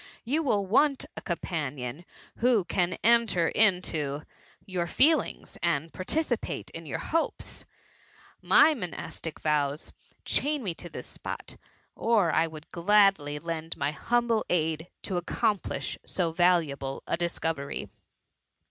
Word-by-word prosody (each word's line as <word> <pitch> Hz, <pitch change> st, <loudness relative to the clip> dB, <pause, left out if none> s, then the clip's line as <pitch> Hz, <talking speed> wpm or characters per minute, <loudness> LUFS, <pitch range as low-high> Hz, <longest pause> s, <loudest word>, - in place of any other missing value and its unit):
You 285 Hz, +7 st, +1 dB
will 210 Hz, -10 st, +1 dB
want 275 Hz, +7 st, +3 dB
a -, -, -6 dB
companion 150 Hz, -4 st, -4 dB, 0.3 s
who 235 Hz, -4 st, +3 dB
can 180 Hz, 0 st, 0 dB
enter 225 Hz, -7 st, +4 dB
into 160 Hz, -8 st, +1 dB, 0.4 s
your 180 Hz, -3 st, -2 dB
ieelings, 305 Hz, -, +2 dB
and 165 Hz, -2 st, 0 dB
participate 240 Hz, -, -2 dB
in 165 Hz, -1 st, -8 dB
your -, -, -2 dB
hopes* 330 Hz, +1 st, -2 dB, 0.8 s
My 315 Hz, -, +6 dB
monastic 175 Hz, -, -6 dB
vows' 150 Hz, -1 st, 0 dB, 0.3 s
chain 295 Hz, -2 st, +1 dB
me 185 Hz, -5 st, -1 dB
to 175 Hz, +1 st, -10 dB
this -, -, -7 dB
spot, -, -, -6 dB, 0.4 s
or 215 Hz, -7 st, +3 dB
I 165 Hz, -, +3 dB
would 155 Hz, -1 st, -11 dB
gladly 190 Hz, -5 st, +3 dB
lend 165 Hz, +1 st, -4 dB
my 140 Hz, +1 st, 0 dB
humble 235 Hz, +6 st, +1 dB
aid 160 Hz, -1 st, 0 dB, 0.2 s
to 185 Hz, -, -2 dB
accomplish 205 Hz, +3 st, -1 dB
so 175 Hz, -3 st, -1 dB
valuable 160 Hz, -6 st, +1 dB
a -, -, 0 dB
discovery. 165 Hz, -4 st, -2 dB
175 Hz, 120 wpm, -28 LUFS, 160-220 Hz, 0.8 s, My